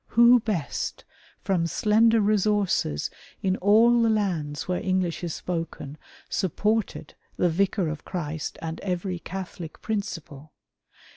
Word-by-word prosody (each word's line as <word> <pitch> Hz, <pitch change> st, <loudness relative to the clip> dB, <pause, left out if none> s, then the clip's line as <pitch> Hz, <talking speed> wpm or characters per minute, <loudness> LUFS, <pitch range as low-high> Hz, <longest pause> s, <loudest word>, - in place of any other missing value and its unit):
Who 235 Hz, +2 st, +6 dB
best, 210 Hz, -10 st, -3 dB, 0.4 s
from 175 Hz, -4 st, +1 dB
slender 220 Hz, +5 st, +3 dB
resources, 205 Hz, -, +1 dB, 0.3 s
in 190 Hz, -1 st, +2 dB
all 230 Hz, +4 st, +5 dB
the 230 Hz, -, +3 dB
lands 175 Hz, -9 st, -1 dB
where 180 Hz, -1 st, -1 dB
English 185 Hz, -2 st, -1 dB
is 170 Hz, -2 st, -3 dB
spoken, 165 Hz, -5 st, -4 dB, 0.3 s
supported 210 Hz, +3 st, -1 dB, 0.2 s
the 180 Hz, -, +3 dB
Vicar 190 Hz, +1 st, +1 dB
of 155 Hz, 0 st, -5 dB
Christ 160 Hz, -4 st, -4 dB
and 160 Hz, 0 st, -4 dB
every 180 Hz, -1 st, -3 dB
Catholic 180 Hz, -3 st, -7 dB
principle 165 Hz, -9 st, -5 dB
185 Hz, 120 wpm, -26 LUFS, 165-210 Hz, 0.4 s, Who